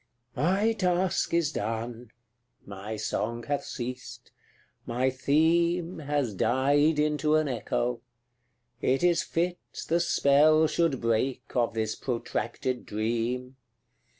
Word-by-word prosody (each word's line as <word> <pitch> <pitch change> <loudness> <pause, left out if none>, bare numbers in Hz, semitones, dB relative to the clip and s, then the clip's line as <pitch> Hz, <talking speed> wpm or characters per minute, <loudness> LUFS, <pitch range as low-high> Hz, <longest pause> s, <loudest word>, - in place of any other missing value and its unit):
CLXXXV. 130 - -2
My 200 +7 +2
task 185 -3 0
is 165 -3 +2
done 115 0 -4 0.6
my 100 +2 -6
song 110 +2 -3
hath 145 +2 -2
ceased 125 0 -7 0.6
my 125 +3 +1
theme 165 +6 +1
Has 145 -6 -1
died 145 - +2
into 150 0 +2
an 155 -1 +2
echo; 120 -1 -2 0.8
it 135 +5 +1
is 170 -1 +4
fit 175 +1 -1 0.3
The 170 +1 +2
spell 155 -2 +4
should 155 -3 0
break 120 +3 0
of 120 -2 +1
this 110 -1 -1
protracted 120 0 -3
dream. 120 +4 -2
135 Hz, 115 wpm, -28 LUFS, 120-160 Hz, 0.8 s, is